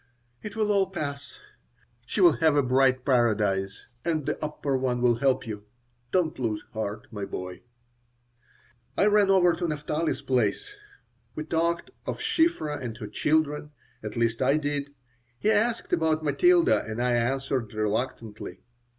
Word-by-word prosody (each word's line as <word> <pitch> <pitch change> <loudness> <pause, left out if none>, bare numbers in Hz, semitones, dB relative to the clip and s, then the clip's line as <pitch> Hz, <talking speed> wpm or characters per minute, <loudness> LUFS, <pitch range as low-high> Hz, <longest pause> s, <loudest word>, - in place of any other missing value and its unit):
"It 210 -1 -7
will 215 -1 +1
all 195 -2 +2
pass. 150 - -5 0.7
She - - -1
will 350 - +6
have 160 -3 +3
a 145 - +4
bright 130 0 +3
paradise, 105 -7 +1 0.2
and 160 -4 -1
The - - -3
Upper 150 -2 -2
One 130 -2 0
will 120 -1 +3
help 135 +1 +1
you. 105 -2 -6 0.5
Don't 175 -6 +1
lose 110 -4 -2
heart, 110 -1 -4
my 105 -3 -5
boy." 90 -2 -6 1.4
I - - +4
ran 205 -1 +4
over 180 -3 +5
to 175 +1 -2
Naphtali's 155 +1 -2
place. 125 - 0 0.6
We 155 - -3
talked 170 +2 -1 0.2
of - - -2
Shiphrah 335 - +1
and 115 -3 -5
her 115 - -6
children 150 +6 0 0.3
at 105 +2 -6
least 115 0 0
I 135 +3 +3
did. 145 -1 -2 0.5
He 215 - +2
asked 225 +2 +1
about 160 -1 +2
Matilda, 345 - +4
and 110 +1 -5
I 125 0 +2
answered 130 -1 0
reluctantly. 110 0 -3
140 Hz, 150 wpm, -27 LUFS, 115-170 Hz, 1.4 s, will